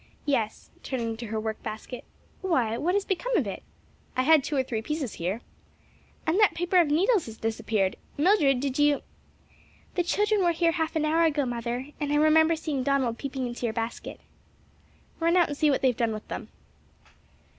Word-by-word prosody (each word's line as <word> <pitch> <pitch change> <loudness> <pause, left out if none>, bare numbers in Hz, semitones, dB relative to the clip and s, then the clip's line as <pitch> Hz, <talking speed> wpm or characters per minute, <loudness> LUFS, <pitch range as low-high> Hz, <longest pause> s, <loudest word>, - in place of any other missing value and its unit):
"Yes," 230 -7 -1
turning 230 -4 -3
to 235 0 -6
her 220 +1 -2
work 220 0 -4
basket. 220 +3 -7 0.4
"Why, 255 - +1
what 345 +10 0
has 405 -1 +1
become 465 +5 0
of 285 - +1
it? 200 - -5 0.6
I 255 - +3
had 310 0 +5
two 295 - -3
or 265 - +2
three 230 -4 -3
pieces 290 -1 -3
here. 190 +7 -2 0.8
And 325 +5 +2
that 415 -6 +4
paper 350 +2 +1
of 345 -3 +5
needles 365 - +2
has 225 -1 -9
disappeared! 220 -3 -1 0.2
Mildred 295 -5 +4
did 275 +1 -2
you 290 -1 +3 0.5
" - - -30
"The 360 - +1
children 415 +3 +1
were 345 -1 +3
here 335 0 +2
half 325 -1 -2
an 310 -1 +1
hour 320 +2 +3
ago, 295 -3 +1
mother, 245 +2 -3
and 290 -1 -2
I - - +2
remember 315 +2 +5
seeing 305 -4 -3
Donald 255 -3 0
peeping 270 -2 -3
into 240 0 -3
your 220 - -2
basket." 230 0 -5 1.0
"Run 335 +2 +3
out 350 - +4
and 290 - -3
see 305 - +3
what 275 - +1
they 260 - +6
have 245 - -3
done 230 -2 +1
with 215 - -7
them." - - -5
285 Hz, 200 wpm, -27 LUFS, 235-330 Hz, 1.0 s, they